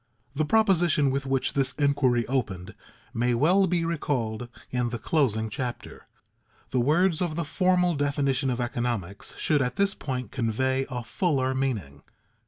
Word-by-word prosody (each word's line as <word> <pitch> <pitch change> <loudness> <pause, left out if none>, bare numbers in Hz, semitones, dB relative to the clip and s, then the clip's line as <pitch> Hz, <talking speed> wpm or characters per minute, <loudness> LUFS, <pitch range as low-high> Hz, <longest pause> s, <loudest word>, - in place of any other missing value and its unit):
_ - - -44 0.3
The 155 +2 0
proposition 175 -8 +3
with 135 0 -2
which 135 -1 0
this 135 -2 +1
inquiry 135 -5 +2
opened 105 -7 -3 0.4
may 120 +1 +1
well 180 +10 +4
be 170 -1 0
recalled 125 -8 -2 0.2
in 125 -1 0
the 120 - -4
closing 115 -4 0
chapter. 120 +3 -6 0.6
The 130 - +1
words 160 +6 +2
of 170 -4 -1
the 170 0 -2
formal 180 +2 +2
definition 140 -2 0
of 125 -1 -2
economics 120 -6 -3
should 150 -2 +2
at 125 -1 -1
this 200 0 +2
point 125 -5 -5
convey 130 +2 0
a 125 -2 -4
fuller 130 +1 0
meaning. 105 - -3
135 Hz, 155 wpm, -26 LUFS, 120-155 Hz, 0.6 s, well